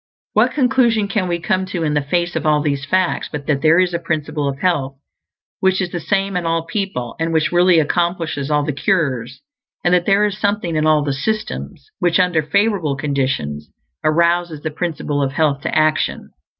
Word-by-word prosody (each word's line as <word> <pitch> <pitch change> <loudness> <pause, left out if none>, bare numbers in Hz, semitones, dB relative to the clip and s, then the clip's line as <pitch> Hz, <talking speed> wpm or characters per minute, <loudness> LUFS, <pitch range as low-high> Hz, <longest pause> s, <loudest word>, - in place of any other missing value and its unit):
What - - +3
conclusion 250 -6 +2
can 195 -2 -1
we 175 -1 0
come 185 +3 -1
to 180 -3 -3
in 150 -2 0
the 150 - +2
face 175 +5 -1
of - - -1
all 150 -2 +3
these 145 -1 -1
facts 185 +4 0
but 145 -2 -5
that 140 -2 0
there 160 +1 +5
is 180 -1 +2
a 170 - 0
Principle 150 -3 -2
of 135 - -5
Health 140 -5 0 0.6
which 190 0 +2
is 180 -2 -2
the 175 - -3
same 195 +2 -1
in 180 - -1
all 165 0 0
people, 165 - -3
and 165 0 -1
which 160 -1 +1
really 175 0 +4
accomplishes 165 -2 -1
all 150 -1 +2
the 150 0 -2
cures; 130 - -1 0.4
and 175 - +2
that 175 -1 +2
there 200 +1 +4
is 205 -1 -3
something 205 -5 -1
in 155 0 +1
all 155 -1 +4
the 145 -1 -1
"systems" 215 +11 -4
which, 175 -1 +2
under 180 -3 +3
favorable 195 -2 +1
conditions, 130 - -2 0.3
arouses 170 0 +1
the 155 - -3
Principle 150 -3 -2
of 135 -1 -1
Health 145 -2 +1
to - - -2
action? 155 0 0
165 Hz, 200 wpm, -19 LUFS, 145-185 Hz, 0.6 s, there